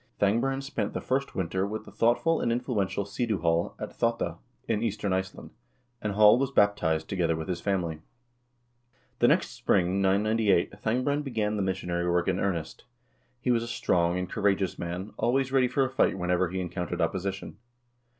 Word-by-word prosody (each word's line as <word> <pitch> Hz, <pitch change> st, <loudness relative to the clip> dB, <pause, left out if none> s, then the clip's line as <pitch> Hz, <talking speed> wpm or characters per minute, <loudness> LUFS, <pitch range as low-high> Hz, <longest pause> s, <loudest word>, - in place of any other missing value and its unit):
Thangbrand 125 Hz, +7 st, +1 dB
spent 135 Hz, -, -3 dB
the -, -, -2 dB
first 135 Hz, +2 st, -2 dB
winter 95 Hz, +1 st, -1 dB
with 110 Hz, +1 st, -5 dB
the -, -, -12 dB
thoughtful 125 Hz, +8 st, +2 dB
and 120 Hz, -, +1 dB
influential 115 Hz, -5 st, -1 dB
Sidu 110 Hz, +1 st, -1 dB
Hall 85 Hz, 0 st, +1 dB
at -, -, -7 dB
pottaa, 115 Hz, -8 st, 0 dB, 0.3 s
in 110 Hz, -2 st, 0 dB
eastern 105 Hz, -3 st, -1 dB
Iceland, 95 Hz, 0 st, -4 dB, 0.5 s
and 105 Hz, -1 st, -2 dB
Hall 105 Hz, +3 st, +6 dB
was 135 Hz, -1 st, +1 dB
baptized, 90 Hz, -10 st, +2 dB
together 85 Hz, -4 st, 0 dB
with 80 Hz, 0 st, -5 dB
his 90 Hz, -2 st, -3 dB
family. 85 Hz, -6 st, -1 dB, 1.2 s
The -, -, +5 dB
next -, -, +3 dB
spring, 95 Hz, +1 st, +1 dB
998, 100 Hz, -1 st, +2 dB
Thangbrand 125 Hz, +8 st, -1 dB
began 110 Hz, -6 st, -1 dB
the 105 Hz, -, -1 dB
missionary 90 Hz, -2 st, -1 dB
work 85 Hz, 0 st, +1 dB
in 95 Hz, -1 st, +1 dB
earnest. 85 Hz, -5 st, -3 dB, 0.6 s
He 125 Hz, -, +1 dB
was 115 Hz, -1 st, +2 dB
a 115 Hz, -, -5 dB
strong 85 Hz, -6 st, +1 dB
and 90 Hz, 0 st, -2 dB
courageous 95 Hz, -1 st, 0 dB
man, 90 Hz, +4 st, -4 dB
always 130 Hz, +2 st, +1 dB
ready 130 Hz, -2 st, +4 dB
for 135 Hz, +2 st, +1 dB
a -, -, -3 dB
fight 130 Hz, -, +2 dB
whenever 90 Hz, 0 st, +1 dB
he 95 Hz, +2 st, -3 dB
encountered 90 Hz, -1 st, -4 dB
opposition. 95 Hz, +1 st, -2 dB
100 Hz, 170 wpm, -28 LUFS, 90-115 Hz, 1.2 s, Hall